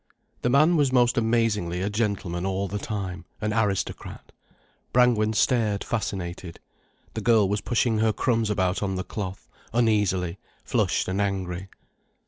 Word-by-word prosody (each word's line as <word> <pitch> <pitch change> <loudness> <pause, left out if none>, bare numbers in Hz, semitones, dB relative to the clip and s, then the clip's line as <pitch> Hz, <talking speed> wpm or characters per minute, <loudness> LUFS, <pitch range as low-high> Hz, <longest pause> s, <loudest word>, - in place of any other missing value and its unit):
The 120 - +1
man 155 +6 +5
was 140 -3 +3
most 120 -2 +3
amazingly 110 -6 +1
a 100 - 0
gentleman 100 -5 -1
all 95 +1 -1
the 105 +2 -4
time, 95 -5 -4 0.2
an 105 0 -1
aristocrat. 105 -3 -2 0.6
Brangwen 120 -3 +3
stared 110 -2 +2
fascinated. 90 -5 -4 0.5
The 110 - -4
girl 110 -2 +4
was 100 +1 -1
pushing 115 -1 +1
her 110 0 +3
crumbs 115 0 0
about 95 -2 0
on 95 -2 -1
the 95 - -2
cloth, 95 -2 -6 0.3
uneasily, 105 -6 +1 0.2
flushed - - 0
and 95 +2 -1
angry. 95 -2 -2
105 Hz, 140 wpm, -25 LUFS, 95-115 Hz, 0.6 s, man